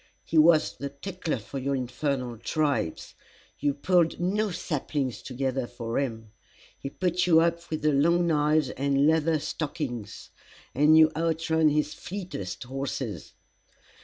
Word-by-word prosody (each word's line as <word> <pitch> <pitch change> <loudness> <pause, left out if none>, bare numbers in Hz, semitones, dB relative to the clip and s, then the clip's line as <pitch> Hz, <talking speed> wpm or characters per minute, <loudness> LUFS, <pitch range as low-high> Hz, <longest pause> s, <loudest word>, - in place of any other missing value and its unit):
He 160 - +2
was 155 0 +4
the 140 - -4
tickler 165 +2 -4
for 120 +5 -7
your 140 +1 -1
infernal 125 -2 -3
tribes! 145 - -1 0.5
You 145 -1 0
pulled 170 +2 +2
no 205 +4 0
saplings 145 -6 -3
together 130 -1 -2
for 120 0 -3
him. 115 -5 -4 0.5
He 135 - -5
put 180 +2 0
you 165 -2 +6
up 170 +1 0
with 155 -1 -4
'the 155 -1 +3
long 170 +5 +3
knives 150 -3 +2
and 140 +1 +1
leather 160 +1 +3
stockings,' 145 - -5 0.4
and 150 +4 +5
you 160 0 +7
outrun 160 -1 +2
his 150 0 0
fleetest 180 - -6
horses. 135 +2 -5
150 Hz, 135 wpm, -27 LUFS, 135-165 Hz, 0.5 s, you